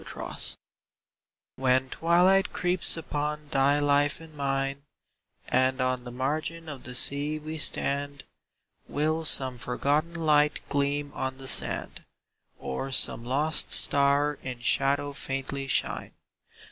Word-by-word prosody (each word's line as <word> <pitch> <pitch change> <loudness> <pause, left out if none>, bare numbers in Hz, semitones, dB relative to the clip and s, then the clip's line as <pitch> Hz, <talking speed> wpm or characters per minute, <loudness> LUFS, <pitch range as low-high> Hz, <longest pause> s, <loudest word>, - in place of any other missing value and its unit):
'* - - -10 1.5
HEN 130 0 +2
twilight 180 +4 +3
creeps 180 -1 +1
upon 150 -1 -3
thy 135 +2 +3
life 145 0 +2
and 165 -1 -13
mine, 135 0 -1 0.7
And 130 +1 +2
on 130 -1 0
the 120 - -7
margin 155 +6 -3
of 145 -4 -8
the 125 0 -6
sea 145 +4 -1
we 155 +1 -6
stand, 140 -1 0 0.6
Will 155 +2 0
some 130 -4 +1
forgotten 145 +7 0
light 150 -2 +3
gleam 145 0 0
on 130 0 -3
the 135 0 -7
sand, - - -2 0.5
Or 135 - -4
some 115 - +2
lost 145 +5 +1
star 140 +1 +3
in 125 -2 -6
shadow 140 +4 +1
faintly 135 0 -4
shine - - -1
140 Hz, 120 wpm, -27 LUFS, 130-150 Hz, 1.5 s, twilight